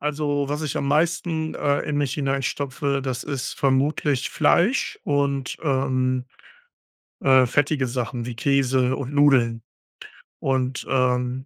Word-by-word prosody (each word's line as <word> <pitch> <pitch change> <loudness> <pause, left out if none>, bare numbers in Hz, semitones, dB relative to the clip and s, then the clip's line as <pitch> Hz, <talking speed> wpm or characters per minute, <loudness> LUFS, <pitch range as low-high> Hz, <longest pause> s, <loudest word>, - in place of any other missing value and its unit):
Also, 145 -1 -1
was 150 +2 -3
ich 150 - -3
am 140 - -1
meisten 160 +1 0
äh, 145 0 0
in 150 -1 -3
mich 140 -2 -1
hinein 135 -2 -1
stopfe, 140 +1 -2
das 130 -2 -3
ist 140 -3 -4
vermutlich 135 0 +1
Fleisch 220 +10 +2
und 140 -2 -1
ähm, 130 -3 0 1.0
äh, 130 -2 +5
fettige 140 +1 +1
Sachen 120 -1 -3
wie 120 -2 -6
Käse 130 -1 +2
und 140 +1 -5
Nudeln. 125 -6 +3 0.8
Und 130 -1 -1
ähm, 125 0 0
135 Hz, 130 wpm, -23 LUFS, 130-145 Hz, 1.0 s, äh